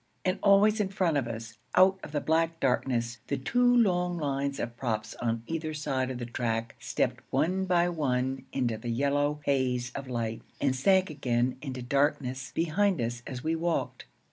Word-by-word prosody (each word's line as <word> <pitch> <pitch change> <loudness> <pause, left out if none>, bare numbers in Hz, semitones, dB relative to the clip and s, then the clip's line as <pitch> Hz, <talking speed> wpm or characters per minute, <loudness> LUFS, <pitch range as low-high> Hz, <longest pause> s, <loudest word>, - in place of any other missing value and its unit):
And 185 +1 +1
always 205 +2 +5
in 200 -2 +1
front 185 -5 +1
of 130 -4 0
us, 115 -1 -7 0.2
out 190 +1 +6
of - - -8
the 150 - 0
black 165 +1 +1
darkness, 120 -2 0
the 140 - -1
two 245 - +1
long 180 -5 +2
lines 140 -2 -1
of 120 0 -4
props 110 -4 -2
on 115 -1 -1
either 160 0 -3
side 130 -3 -1
of 130 - -4
the 120 - -4
track 115 -1 -2
stepped - - -1
one 190 +3 +1
by 175 -1 +3
one 135 -5 -1
into 120 -5 -1
the 120 - -5
yellow 145 +4 +1
haze 125 -3 +1
of 140 -1 -6
light 115 -2 -2 0.2
and 135 -2 +1
sank 190 +6 +3
again 125 -3 0
into 130 -4 -5
darkness 130 -1 0
behind 185 +2 +2
us 120 0 -2
as 125 -1 -6
we 160 +1 +1
walked. 165 +1 -2
140 Hz, 180 wpm, -29 LUFS, 120-165 Hz, 0.2 s, out